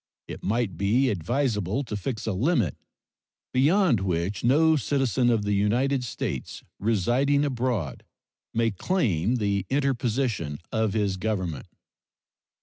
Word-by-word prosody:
It - - -7
might 110 -2 -1
be 120 +7 +2
advisable 105 - -1
to 115 -5 -5
fix 110 +3 -4
a 110 - -1
limit 115 - +1 0.8
beyond 150 - +4
which 95 +1 -2
no 155 +6 +4
citizen 130 -2 +1
of 115 -3 +2
the 105 0 0
United 125 +7 +1
States 120 - -5 0.2
residing 120 +8 +2
abroad 120 - -2 0.5
may 115 0 +1
claim 110 - 0
the 100 -4 -1
interposition 125 - 0
of 110 -2 0
his 100 -3 0
Government. 95 -7 -3
115 Hz, 120 wpm, -26 LUFS, 100-135 Hz, 0.8 s, beyond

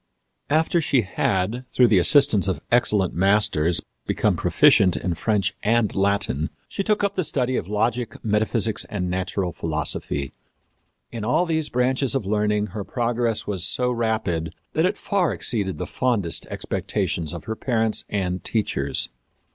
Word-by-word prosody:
After 160 +3 +2
she 140 -4 +2
had, 100 +5 -1
through 125 - +5
the 100 - +5
assistance 110 - +5
of 95 - -1
excellent 105 -6 +2
masters, 90 -3 +2 0.3
become - - +1
proficient 90 -5 +4
in 85 +3 -2
French 105 +2 0
and 115 0 +1
Latin, 100 -6 0 0.2
she - - -4
took 210 +1 0
up 200 0 +1
the 185 - -1
study 130 -4 -1
of 85 - -2
logic, 110 +3 -1
metaphysics 110 0 +1
and 90 -4 -3
natural 95 -1 -2
philosophy. 75 -3 -2 0.8
In 115 -3 -5
all 125 +11 +2
these 160 -3 -1
branches 130 +2 +1
of 135 - -1
learning 105 +1 0
her 105 -1 -4
progress 120 0 -1
was 95 -4 -3
so 125 +5 0
rapid 110 -9 -1 0.2
that 160 +2 +2
it - - -2
far 195 -5 0
exceeded 100 -6 -2
the - - -4
fondest 115 -10 -1
expectations 80 -3 -3
of 85 -2 -7
her 110 - -4
parents 110 -3 0
and 90 -3 -2
teachers. 70 - 0
105 Hz, 150 wpm, -23 LUFS, 95-125 Hz, 0.8 s, through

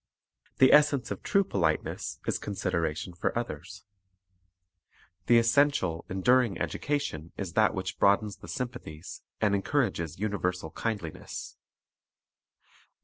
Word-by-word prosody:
The 130 - +6
essence 145 -3 +4
of - - -4
true 200 - +3
politeness 85 - -1
is - - -1
consideration 85 -4 -2
for 90 +7 -2
others. 100 -2 -6 1.4
The 120 - +6
essential, 115 - +2
enduring 115 +2 +3
education 140 - -2
is 95 -4 -4
that 110 -1 +3
which 95 0 -4
broadens 100 +1 +3
the 95 - -12
sympathies 85 -5 -6 0.2
and 105 -1 +3
encourages 95 - 0
universal 90 -5 -2
kind 110 -2 -2
liness. 80 -2 -7
100 Hz, 110 wpm, -29 LUFS, 85-120 Hz, 1.4 s, The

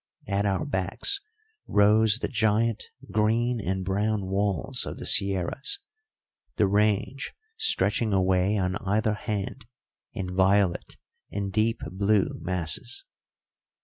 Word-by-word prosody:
At 100 +1 0
our 95 -2 0
backs 95 - -1 0.5
rose 105 +1 +4
the - - -2
giant 110 -1 +1 0.3
green 115 +2 +1
and 95 +1 -2
brown 100 +1 0
walls 95 -4 0
of - - -6
the - - -7
sierras, 100 - +3 0.8
the 105 - +3
range 105 +6 0 0.2
stretching 115 - +1
away 95 +1 +2
on 95 0 0
either 105 +2 0
hand 105 +3 -4 0.4
in 95 -4 -5
violet 95 -1 +2 0.3
and 100 -1 -4
deep 110 +3 +1
blue 100 +1 +2
masses. 90 - -3
100 Hz, 115 wpm, -26 LUFS, 95-110 Hz, 0.8 s, rose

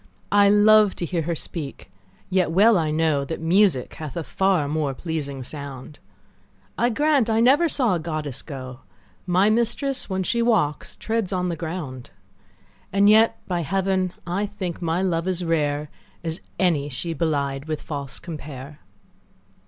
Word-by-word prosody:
I 205 0 +6
love 210 0 +6
to 175 - -3
hear 170 0 -1
her 170 +2 -2
speak, 145 - -7 0.4
yet 185 -3 +1
well 205 +7 +5
I 160 -4 +1
know 155 -2 +1
That 160 +4 -5
music 165 -5 +2
hath 155 0 -7
a 170 - -2
far 190 -4 +1
more 145 -2 -1
pleasing 140 -4 -4
sound: 140 0 -8 0.8
I 240 - +2
grant 285 -1 +2
I 220 0 +2
never 280 +8 +5
saw 250 -9 +1
a 175 - 0
goddess 155 -5 -4
go; 130 -4 -8 0.5
My 185 +4 +4
mistress, 235 +4 0
when 190 0 -1
she 235 +6 0
walks, 220 -11 +1
treads 225 -4 -2
on 180 -1 0
the 170 - -2
ground: 155 -6 -6 0.8
And 200 +2 +5
yet 220 +1 +5
by 175 -2 -1
heaven, 190 +2 0
I 190 +4 -1
think 190 -5 -5
my 170 +2 0
love 170 -2 0
as 180 -1 -1
rare, 150 -2 0 0.3
As 165 0 -4 0.2
any 155 -6 +1
she 165 +6 -3
belied 140 -4 -1
with 155 -1 -3
false 140 -3 -6
compare. 145 -3 -8
170 Hz, 160 wpm, -23 LUFS, 150-200 Hz, 0.8 s, I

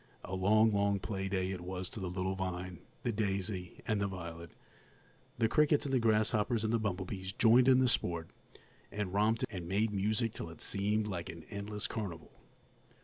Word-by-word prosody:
A 90 - -6
long, 105 +4 +4
long 100 0 +2
play 95 -1 -3
day 95 -1 0
it 90 -2 -4
was 90 +1 -4
to - - -6
the 95 -2 -3
little 95 +1 -1
vine, 90 -2 -4 0.2
the 120 - +1
daisy, 95 -3 -2
and 110 -2 +1
the 100 - +1
violet. 85 -3 -7 0.9
The 115 - +3
crickets 150 +4 +3
and 135 - -2
the 130 - +4
grasshoppers 110 0 +2
and 110 +1 0
the 115 - +3
bumblebees 95 -2 -3
joined 120 +2 +5
in 130 -1 +7
the 130 0 +4
sport, 85 -8 0 0.6
and 100 -3 -3
romped 110 +3 +2
and 90 -5 -5
made 105 +4 +1
music 110 +3 +1
till 85 - -6
it 80 - -11
seemed 105 +2 0
like 90 -4 -4
an 85 -1 -9
endless 105 0 -4
carnival. 95 -8 -5
100 Hz, 185 wpm, -33 LUFS, 95-110 Hz, 0.9 s, in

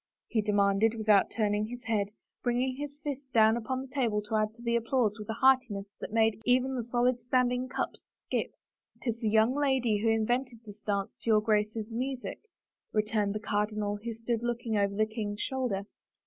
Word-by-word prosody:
he 220 - +1
demanded, 205 +1 +3
without 215 -3 +4
tumin^^ 210 -1 0
his 245 +1 -7
head, 210 -3 0 0.3
bringing 250 +1 0
his 290 0 -6
fist 280 -2 -3
down 220 0 +6
upon 245 +3 -2
the 265 - -8
table 235 -7 +1
to 210 +1 -7
add 215 0 +1
to 230 +2 -17
the 235 0 +1
applause 230 -2 +1
with 210 - -8
a - - 0
heartiness 250 -6 +3
that - - -6
made 220 -1 +2
even 255 +2 +3
the 250 - -1
solid 245 +1 +1
standing 250 +1 +1
cups - - -3 0.2
skip. - - -2 0.3
" - - -37
Tis 230 -2 -2
the 220 -2 +1
yoimg 220 +4 +4
lady 255 -7 +2
who 225 +2 +2
invented 240 +3 0
this 205 -1 -11
dance 200 -2 -2
to - - -3
yoiu* 215 -1 +5
Grace's 215 +1 0
music," 255 +2 -3 0.5
returned 210 -1 0
the - - -1
cardinal 210 -1 -1
who 230 +3 -5
stood 230 0 -2
looking 240 -1 -2
over 200 -1 +1
the 215 +1 +3
king's 215 -2 -4
shoulder. 250 -8 -1
225 Hz, 190 wpm, -30 LUFS, 210-245 Hz, 0.5 s, down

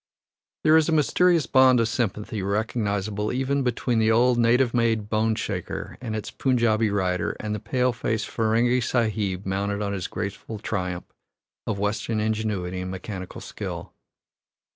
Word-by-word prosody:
There 155 - +6
is 160 0 +3
a - - +2
mysterious 165 +1 +3
bond 130 -1 +5
of 115 - +2
sympathy 105 -2 -2
recognizable 105 0 -1
even 135 +2 0
between 125 -2 0
the 110 0 +3
old 120 +2 +4
native 120 +1 +3
made 115 -3 +1
bone 110 0 +1
shaker 100 -5 -4
and 110 -3 -4
its 110 - -4
Punjabi 115 -4 +2
rider 95 -3 -1
and 105 0 -3
the 105 - -3
pale 125 +3 0
faced 110 -1 -2
Ferenghi 120 +3 +2
Sahib 105 -5 0
mounted 100 +2 -1
on 100 0 -2
his 95 -3 -3
graceful 105 +2 -5
triumph 90 -4 -3 0.6
of 110 - -1
Western 105 +2 -1
ingenuity 105 -4 -1
and 90 - -4
mechanical 95 0 -6
skill. - - -6
110 Hz, 150 wpm, -25 LUFS, 100-120 Hz, 0.6 s, There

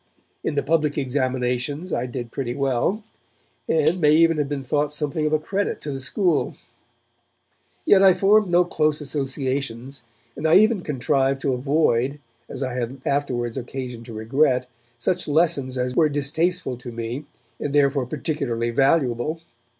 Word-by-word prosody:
In - - -2
the 140 - +1
public 155 0 +1
examinations 130 +3 -1
I 120 +2 -1
did 120 -2 -6
pretty 125 -3 -3
well, 140 - 0 0.7
and 160 +3 +2
may 150 -1 +5
even 165 0 +4
have 145 -2 -1
been 140 -2 -3
thought 145 +3 0
something 150 +1 -1
of - - -1
a 155 - +4
credit 195 +6 -2
to 150 - -4
the 135 - -4
school. 165 +4 0 1.3
Yet 195 - +6
I 190 -2 +7
formed 205 +1 +4
no 175 +1 +4
close 155 -3 +1
associations, 135 -3 -3 0.3
and 155 - -1
I 160 - +5
even 215 +1 +5
contrived 135 -2 0
to 135 - +1
avoid, 135 0 +1 0.3
as 135 0 -4
I 130 -1 -3
had 125 +2 -4
afterwards 125 -4 -1
occasion 125 -2 -6
to 115 - -9
regret, 125 +3 +1 0.3
such 175 +9 -1
lessons 145 -4 +1
as 125 0 -2
were 155 -2 +4
distasteful 145 0 -1
to 120 0 -8
me, 115 +5 -5 0.3
and 145 - -3
therefore 140 -2 +2
particularly 125 -5 -2
valuable. 135 +2 +1
140 Hz, 155 wpm, -23 LUFS, 125-155 Hz, 1.3 s, I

